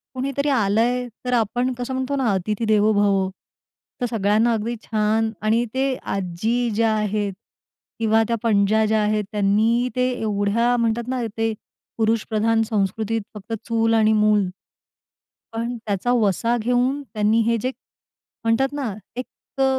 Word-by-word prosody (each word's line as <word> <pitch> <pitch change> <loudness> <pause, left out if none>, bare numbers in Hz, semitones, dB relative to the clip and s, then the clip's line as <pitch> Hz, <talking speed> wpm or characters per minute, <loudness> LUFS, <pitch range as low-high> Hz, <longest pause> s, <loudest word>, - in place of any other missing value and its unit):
कुणीतरी 275 +2 -1
आलंय, 240 +1 +2 0.2
तर 250 - 0
आपण 245 +2 +1
कसं 245 +1 -5
म्हणतो 260 +2 -1
ना, 260 -5 +1
अतिथी 210 +4 -1
देवो 215 0 +3
भव. 200 -2 +2 0.7
तर - - +2
सगळ्यांना 220 +1 +2
अगदी 225 +2 -2
छान 220 +1 +1
आणि 220 +3 +2
ते 265 +1 +1 0.2
आजी 205 +6 -1
ज्या 225 0 +2
आहेत 210 -1 -1 0.7
किंवा 225 0 +3
त्या 235 - +1
पणज्या 215 0 +3
ज्या 215 0 +2
आहेत, 210 0 +1
त्यांनी 215 +4 +2
ते 250 0 +2
एवढ्या 215 +3 +1
म्हणतात 230 0 0
ना 255 -1 -1 0.2
ते, 225 0 0 0.4
पुरुषप्रधान 225 0 +1
संस्कृतीत 220 +1 0
फक्त 210 +2 -7
चूल 225 -1 +2
आणि 220 -1 +4
मूल, 210 -1 +3 1.1
पण 235 +2 -3
त्याचा 205 +3 -1
वसा 230 +1 +2
घेऊन 245 +4 +1
त्यांनी 215 +1 +2
हे 230 0 +2
जे 255 - -1 0.7
म्हणतात 230 +5 +1
ना 270 -7 -3 0.2
एक 250 +1 -4 0.4
अ, - - +5
225 Hz, 145 wpm, -22 LUFS, 210-245 Hz, 1.1 s, अ